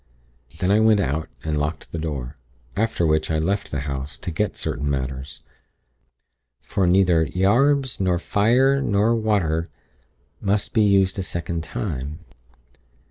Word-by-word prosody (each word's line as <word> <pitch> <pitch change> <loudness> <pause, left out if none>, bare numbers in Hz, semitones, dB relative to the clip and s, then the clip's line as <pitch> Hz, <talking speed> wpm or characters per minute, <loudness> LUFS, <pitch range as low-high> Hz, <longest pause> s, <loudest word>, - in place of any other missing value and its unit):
Then 90 +3 +1
I 105 - +5
went 110 -1 +5
out 80 -3 -1
and 80 -1 -1
locked 75 +1 -3
the 85 - -4
door; 70 -5 -4 0.4
after 110 -5 0
which 80 0 +1
I 80 - +1
left 95 +6 -1
the 70 - -3
house, 70 -2 -5
to 90 - -5
get 105 +6 -1
certain 75 0 -2
matters, 65 0 -4 1.2
for 95 -2 -1
neither 90 -3 +4
'yarbs 130 +8 +2
nor 90 -2 +2
fyre 125 +9 +3
nor 110 0 +2
waier' 95 -8 0 0.7
must 100 +1 0
be 110 - +4
used 100 -2 +3
a - - +1
second 85 -2 -4
time. 75 - -4
90 Hz, 140 wpm, -23 LUFS, 75-105 Hz, 1.2 s, I